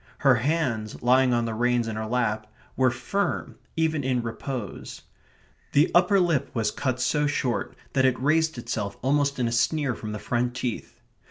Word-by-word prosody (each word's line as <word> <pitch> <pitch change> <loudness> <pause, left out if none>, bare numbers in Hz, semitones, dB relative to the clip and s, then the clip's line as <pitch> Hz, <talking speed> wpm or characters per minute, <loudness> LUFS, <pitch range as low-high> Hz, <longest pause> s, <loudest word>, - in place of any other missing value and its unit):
Her 135 -3 +5
hands, 120 -5 -1
lying 130 +1 +4
on 120 -1 +1
the 115 - -2
reins 120 +1 +1
in 110 - -3
her 110 0 -3
lap, 110 -3 -1 0.2
were 130 -1 +4
firm 130 +12 -2 0.2
even 160 -2 +1
in 125 -2 0
repose. 115 -1 -6 0.7
The 145 +3 +4
upper 180 +3 +5
lip 170 -6 +1
was 110 -2 +1
cut 130 -2 -2
so 150 -1 +1
short 130 -4 -1 0.2
that 130 - +3
it 130 -1 +2
raised 160 +2 +2
itself 105 -4 -4
almost 140 +1 +2
in 125 -2 0
a - - -1
sneer 140 +3 +1
from 110 -1 -6
the 105 - -4
front 120 +3 -1
teeth. 125 -2 -4
125 Hz, 175 wpm, -26 LUFS, 115-145 Hz, 0.7 s, Her